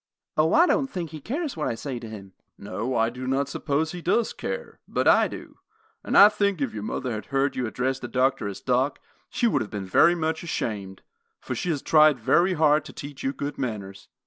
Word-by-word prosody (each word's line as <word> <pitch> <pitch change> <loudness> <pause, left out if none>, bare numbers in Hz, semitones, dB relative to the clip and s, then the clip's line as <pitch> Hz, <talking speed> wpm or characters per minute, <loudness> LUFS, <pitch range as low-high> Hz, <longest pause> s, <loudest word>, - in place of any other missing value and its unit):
"O, 155 +1 +3
I 340 - +6
don't 280 -6 +1
think 175 - -5
he 155 -2 -8
cares 290 - -3
what 155 - -2
I - - -1
say 130 0 -5
to 115 -2 -9
him!" 100 -3 -10 0.2
"No, 105 +6 -4
I 115 0 +2
do 130 +1 -7
not 135 +1 0
suppose 155 +2 -1
he 180 - -7
does 220 +7 +1
care; - - -6
but - - 0
I - - +6
do, - - -10 0.4
and - - +1
I 200 - +11
think 200 -3 0
if 135 -4 -2
your 105 - -5
mother 120 +4 -3
had 110 -3 -5
heard 135 +1 0
you 125 -2 -1
address 130 +3 -2
the 120 - -6
doctor 130 -2 +1
as 100 - -6
Doc, 130 +2 +1 0.3
she 240 - -1
would 230 - +2
have 105 - -4
been 100 -2 -5
very 170 - +5
much 160 -1 -1
ashamed; 100 - -4 0.4
for - - -5
she 180 - -3
has 150 -5 -1
tried 155 -4 +5
very 175 +11 +3
hard 155 -2 +3
to - - -10
teach 140 -1 -8
you 135 - 0
good 145 +1 -5
manners." 100 -6 -5
135 Hz, 225 wpm, -25 LUFS, 115-165 Hz, 0.4 s, I